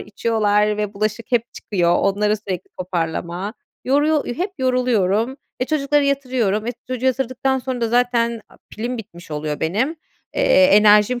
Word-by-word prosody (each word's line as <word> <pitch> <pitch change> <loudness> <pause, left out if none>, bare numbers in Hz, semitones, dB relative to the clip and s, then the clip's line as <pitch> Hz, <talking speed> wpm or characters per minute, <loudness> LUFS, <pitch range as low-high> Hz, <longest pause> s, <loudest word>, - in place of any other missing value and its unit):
içiyorlar 210 -1 +1
ve 210 -1 -3
bulaşık 215 +4 -3
hep 235 -2 +4
çıkıyor; 175 -4 +1
onları 210 +2 +1
sürekli 195 -4 -6
toparlama. 180 +2 -3 0.3
Yoruyor 290 +3 +2
eee, 240 - -3
hep 375 +3 -1
yoruluyorum. 250 -3 +1 0.2
E, - - +2
çocukları 290 0 +1
yatırıyorum; 255 -7 0
e, 240 - -1
çocuğu 255 0 -2
yatırdıktan 265 +1 0
sonra 255 -1 -4
da 230 - +1
zaten, 235 -1 +1
aaa, - - -20
pilim 240 +3 -4
bitmiş 175 -7 -11
oluyor 150 0 -3
benim. 220 - 0 0.4
Eee, 185 - +5
enerjim 210 +4 +5
225 Hz, 150 wpm, -20 LUFS, 200-255 Hz, 0.4 s, Eee